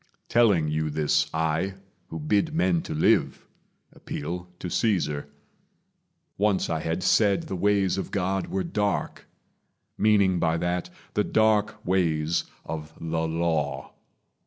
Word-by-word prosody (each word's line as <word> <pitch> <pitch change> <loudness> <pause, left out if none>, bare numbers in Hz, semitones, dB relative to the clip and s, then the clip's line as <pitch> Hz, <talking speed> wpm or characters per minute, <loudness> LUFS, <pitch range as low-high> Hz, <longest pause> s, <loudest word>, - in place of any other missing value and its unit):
Telling 105 -10 +4
you 75 0 -1
this, 75 0 +1
I, 80 +4 -1 0.3
who 80 - -6
bid 105 - +1
men 175 0 +2
to - - -5
live, 80 - +2 0.5
appeal 90 +4 -5
to 90 - -6
Caesar. 85 -8 0 1.1
Once 100 -4 +1
I 80 - 0
had 80 +3 -2
said 100 -3 +3
the 95 - -5
ways 100 0 +2
of - - -4
God 95 0 -1
were 95 -1 -2
dark, 105 -1 -2 0.7
Meaning 100 -4 +4
by 80 -1 +1
that 90 +1 -2 0.2
the 105 - +2
dark 105 0 +1
ways 85 -3 +1 0.2
of 80 -1 -6
the 80 0 -1
Law. 80 -2 -1
90 Hz, 130 wpm, -26 LUFS, 80-100 Hz, 1.1 s, Telling